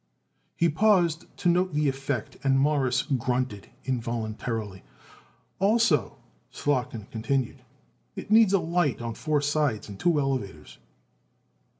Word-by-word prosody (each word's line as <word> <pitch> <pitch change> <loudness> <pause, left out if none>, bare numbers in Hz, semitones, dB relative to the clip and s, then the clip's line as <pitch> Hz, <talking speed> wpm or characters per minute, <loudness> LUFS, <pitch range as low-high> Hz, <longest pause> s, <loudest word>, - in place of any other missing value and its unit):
He 170 - +3
paused 175 -1 +2
to - - -1
note 180 -1 +2
the 150 0 +2
effect 135 -3 -3
and 135 -1 +3
Morris 135 -3 +2
grunted 125 -5 -2 0.2
involuntarily. 115 -4 -3 0.8
"Also," 225 +4 +2 0.3
Slotkin 125 -7 -2
continued, 125 +2 -2 0.5
"it - - -7
needs 215 -3 +6
it - - +6
light 170 -4 0
on 115 -1 -4
four 150 +4 0
sides, 145 -6 0
and 100 -2 -10
two 170 -4 +2
elevators." 110 - -3
135 Hz, 115 wpm, -26 LUFS, 120-170 Hz, 0.8 s, needs